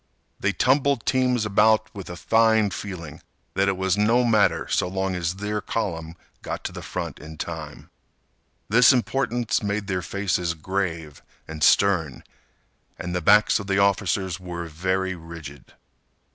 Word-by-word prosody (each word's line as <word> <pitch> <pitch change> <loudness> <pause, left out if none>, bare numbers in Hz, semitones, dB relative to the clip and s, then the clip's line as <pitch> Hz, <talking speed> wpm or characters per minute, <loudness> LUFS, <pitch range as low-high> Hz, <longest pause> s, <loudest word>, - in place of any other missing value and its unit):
They - - +1
tumbled 135 -1 +2
teams 125 -3 +1
about 110 +1 +3
with 100 -4 -8
a 90 - -6
fine 110 +1 +3
feeling 85 -7 -7 0.3
that 100 0 +1
it 95 -1 0
was 95 +1 0
no 115 +4 +3
matter 110 -4 +2
so - - 0
long 95 +1 -2
as 90 0 -2
their 105 +2 -3
column 85 -7 -3 0.3
got - - -5
to - - -4
the - - -8
front - - -5
in 80 +1 -10
time. 80 -2 -7 0.8
This 120 +5 +6
importance 120 -2 0
made 105 0 -2
their 95 -2 -2
faces 90 -1 -1
grave 80 -3 -4 0.3
and 80 -2 -5
stern. 90 -8 +3 0.7
And 90 0 -5
the 90 - -1
backs 105 +7 +5
of 100 - -7
the 95 -1 +1
officers 95 -2 +1
were 90 -2 -6
very 95 +4 -1
rigid. 80 -5 -11
95 Hz, 150 wpm, -24 LUFS, 85-105 Hz, 0.8 s, This